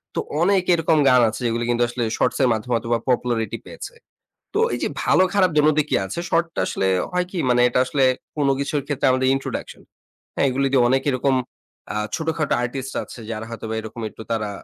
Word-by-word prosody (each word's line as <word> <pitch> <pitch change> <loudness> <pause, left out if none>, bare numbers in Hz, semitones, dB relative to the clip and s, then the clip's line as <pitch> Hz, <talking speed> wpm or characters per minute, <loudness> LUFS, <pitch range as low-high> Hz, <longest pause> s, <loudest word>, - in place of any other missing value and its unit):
তো - - 0 0.2
অনেক 190 +1 +3
এরকম 165 -1 +2
গান 125 -1 +6
আছে 110 - -7
যেগুলি 120 0 0
কিন্তু 120 0 +2
আসলে 120 0 -3
শর্টস 125 - 0
এর 125 - +4
মাধ্যমে 115 +3 -3
হয়তোবা 115 0 0
popularity 120 -3 0
পেয়েছে। - - -9 0.6
তো 415 - +1
এই - - -2
যে - - 0
ভালো 185 - +4
খারাপ 190 -3 +3
দোনো 150 +1 +5
দিকই 150 0 +1
আছে। 95 - -5
শর্ট 170 +1 +2
টা - - 0
আসলে 95 - -1 0.2
হয় 180 0 0
কি? 185 - -5
মানে 125 0 +4
এটা 125 - +1
আসলে 135 +1 0 0.3
কোনো 140 -2 +2
কিছুর 140 +1 -1
ক্ষেত্রে 145 -2 0
আমাদের 130 0 +1
introduction 135 - -5 0.5
হ্যাঁ? - - +2
এইগুলি 135 +2 0
দিয়ে 130 -3 +5
অনেক 135 +1 +2
এরকম 130 +1 +1 0.6
আ - - 0 0.2
ছোটখাটো 160 -2 -1
আর্টিস্ট 135 +2 -4
আছে - - -11
যারা 110 0 -5
হয়তোবা 110 -1 -5
এরকম 110 +2 -8
একটু 110 - -11
তারা 110 -2 -1
130 Hz, 200 wpm, -22 LUFS, 120-150 Hz, 0.6 s, গান